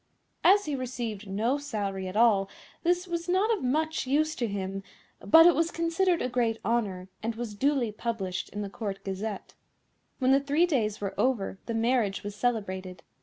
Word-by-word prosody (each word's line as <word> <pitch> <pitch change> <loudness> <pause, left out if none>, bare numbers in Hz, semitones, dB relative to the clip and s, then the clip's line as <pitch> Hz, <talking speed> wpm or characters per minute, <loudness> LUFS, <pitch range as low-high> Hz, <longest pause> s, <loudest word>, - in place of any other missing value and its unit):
As 405 +2 +6
he 300 - -3
received 240 -5 -4
no 225 +8 0
salary 200 -9 -3
at 185 - -6
all 210 -4 +4 0.3
this 355 +1 +1
was 340 0 -3
not 405 +5 +3
of 395 - -7
much 310 +3 0
use 310 +3 +2
to 240 - 0
him, 195 -1 -4 0.4
but 325 +1 +7
it 350 - +7
was 330 +1 +1
considered 335 +2 +1
a - - 0
great 240 -3 0
honour, 200 -5 -1
and 225 +1 -2
was 230 -2 -5
duly 260 0 +1
published 210 -4 -3
in 205 +1 -5
the 200 - -5
Court 200 -2 -5
Gazette. 195 +1 -5 0.6
When 260 -1 +2
the 270 - +6
three 290 +5 +2
days 220 - -1
were 200 -1 -3
over 210 -7 0
the 230 - -2
marriage 225 -3 +1
was 205 0 -5
celebrated. 190 -6 -2
235 Hz, 180 wpm, -28 LUFS, 200-295 Hz, 0.6 s, but